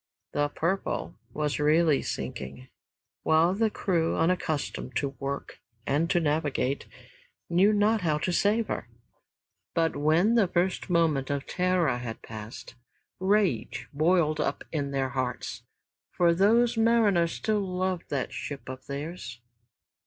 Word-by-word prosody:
"The 145 0 0
Purple" 180 +6 -2 0.2
was 150 -1 -1
really 155 0 +4
sinking, 130 0 -6 0.5
while 160 +3 +3
the 220 +2 +2
crew, 170 -5 0
unaccustomed 160 -6 -1
to 140 - 0
work 140 0 -5 0.3
and 150 +4 +1
to 175 - +3
navigate, 145 -3 0 0.6
knew 190 +5 +5
not 210 +1 +3
how 155 -4 +1
to 175 +4 -1
save 215 +5 +2
her. 120 - -4 0.9
But 165 -1 +1
when 160 +9 +3
the 225 -5 +4
first 180 +2 0
moment 160 -6 +2
of 140 -1 -2
terror 180 -8 +1
had 120 -2 -6
passed, 110 +1 -9 0.5
rage 190 - +1
boiled 155 0 +2
up 140 -1 -1
in 145 -3 -2
their 135 -1 -1
hearts, 130 -2 -4 0.4
for 170 -1 +3
those 230 +6 +4
mariners 220 -7 +3
still 215 -1 0
loved 185 -2 -2
that 140 -3 -2
ship 140 -3 -6
of 130 0 -8
theirs. 140 -4 -6
165 Hz, 130 wpm, -28 LUFS, 140-185 Hz, 0.9 s, knew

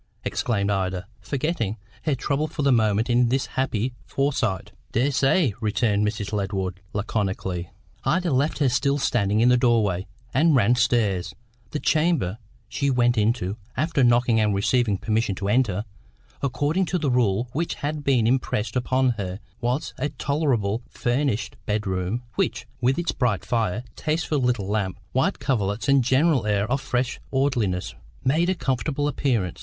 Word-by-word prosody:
exclaimed 105 -4 0
Ida, 95 -2 -1
forgetting 130 - -2 0.3
her 150 -3 +2
trouble 145 +4 -1
for 150 -1 -4
the 140 - +4
moment 110 -2 +2
in 120 0 +3
this 130 +2 +1
happy 130 -2 -1
foresight. 135 -9 -1 0.2
"Dessay," 135 - +2
returned 105 -1 +1
Mrs. 105 -1 -3
Ledward 95 -2 -2
laconically. 95 -4 -2 0.3
Ida 175 0 +1
left 140 +4 +1
her 145 - +2
still 140 +4 +1
standing 110 -5 +1
in 120 - +5
the 125 - +5
doorway, 110 -7 +2 0.3
and 155 +2 +4
ran 120 -2 +4
stairs. 110 -7 +1 0.3
The 150 - -3
chamber 155 - +1 0.3
she 140 -1 -1
went 120 -2 +3
into 105 -2 0 0.2
after 155 -1 +1
knocking 120 -1 +4
and 105 -2 +2
receiving 105 +1 +2
permission 110 0 0
to 100 +1 -4
enter, 105 -3 +1 0.6
according 145 +7 0
to 180 - -1
the 150 -6 0
rule 120 -2 +2
which 165 +4 -1
had 150 +1 -3
been 130 -5 +3
impressed 120 -2 0
upon 130 +1 +2
her 95 0 -4 0.2
was 125 +4 -1
a 150 - 0
tolerably 135 -9 0
furnished 120 -2 -1
bedroom, 105 +1 -1
which, - - -1 0.2
with 130 +3 +2
its 170 -1 0
bright 115 -7 0
fire, 115 -2 0
tasteful 155 -1 -1
little 125 -6 0
lamp, 100 -3 -1
white 130 - +1
coverlets 105 -4 -1
and 140 -2 +5
general 130 -1 +3
air 100 -1 +2
of 135 0 +1
fresh 125 -1 -1
orderliness, 120 -10 0 0.3
made 160 +7 +2
a 185 - +2
comfortable 135 0 -1
appearance. 115 - -1
120 Hz, 150 wpm, -24 LUFS, 105-140 Hz, 0.6 s, in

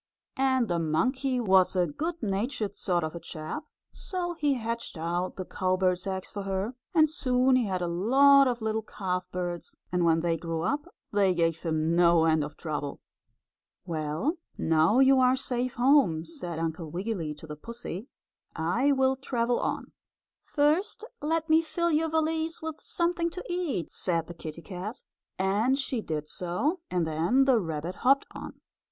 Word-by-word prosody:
And 260 -3 +3
the 175 -3 0
monkey 255 - 0
was 190 -5 +4
a 180 -1 +3
good 320 - -4
natured 210 +1 -2
sort 175 -3 0
of 155 - -3
a 170 - -6
chap, 155 - -6 0.3
so 355 -2 -4
he 295 -4 +1
hatched 230 -4 -4
out 175 +3 -2
the 185 - -5
cowbird's 185 0 0
eggs 190 -1 -4
for 205 - -5
her, 195 +4 -2 0.2
and 315 -1 +6
soon 255 -3 +2
he 250 -2 +3
had 185 -2 -1
a - - -1
lot 270 +10 +5
of 240 -2 -2
little 220 0 0
calfbirds, 180 -4 -4 0.2
and 180 -1 +1
when 165 -1 +3
they 165 -1 +1
grew 165 -1 -3
up 290 - -1 0.3
they 195 -3 +3
gave 165 -1 +1
him 160 0 0
no 170 -1 +5
end 160 -2 +3
of 150 0 -7
trouble. 150 -3 -4 0.9
"Well, 160 - -2 0.2
now 160 +7 +3
you 265 0 +6
are 255 0 +5
safe 250 -1 -2
home," 240 - +4
said 175 - -5
Uncle 160 0 -3
Wiggily 175 -3 -3
to 150 - -11
the 150 -1 -7
pussy, 230 - -7 0.5
"I 205 - +1
will 265 -1 +3
travel 245 -2 0
on." - - -3 0.5
"First, 310 +9 +1 0.2
let 320 +2 0
me 320 0 +5
fill 340 +1 -1
your 320 +1 +2
valise 320 +1 0
with 320 -1 -6
something 340 0 +1
to 365 +2 -7
eat," 345 - -2
said 170 -3 0
the 175 - -9
kittie 165 0 -8
cat, 200 +5 -7 0.3
and 205 +8 +2
she 265 -4 -1
did 155 -5 -4
so, 185 - -1
and 180 -2 0
then 170 +13 +2
the 260 -4 +4
rabbit 165 -1 -4
hopped 275 +2 +3
on. - - -9
200 Hz, 170 wpm, -28 LUFS, 170-270 Hz, 0.9 s, and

